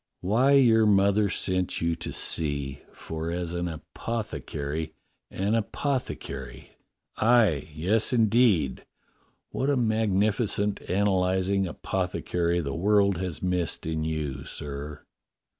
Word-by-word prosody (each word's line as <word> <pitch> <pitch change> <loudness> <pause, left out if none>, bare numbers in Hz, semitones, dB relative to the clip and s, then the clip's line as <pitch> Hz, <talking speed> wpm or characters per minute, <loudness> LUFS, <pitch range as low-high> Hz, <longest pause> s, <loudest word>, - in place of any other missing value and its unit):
"Why 115 +9 +3
your 115 -5 +5
mother 100 0 +4
sent 95 -1 0
you 85 0 0
to - - -5
sea, 70 -4 -2
for 80 0 -6
as 85 0 -3
an 85 0 -2
apothe 110 +7 -5
cary 80 +2 -4 0.2
— - - -50
an 100 +3 -1
apothecary 100 - -3 0.3
— - - -58
aye, 110 - +3
yes, 95 - +1
indeed, 110 - +3 0.7
what 135 - -1
a 140 - +2
magnifi 110 -2 +1
cent 105 0 -1
analyzing 95 0 +1
apothecary 90 -1 -1
the 70 -3 -4
world 100 +3 +3
has 90 -2 -4
missed 90 -3 -1
in 80 -1 -2
you, 75 -4 -3
sir." 75 +2 -7
95 Hz, 125 wpm, -27 LUFS, 80-105 Hz, 0.7 s, your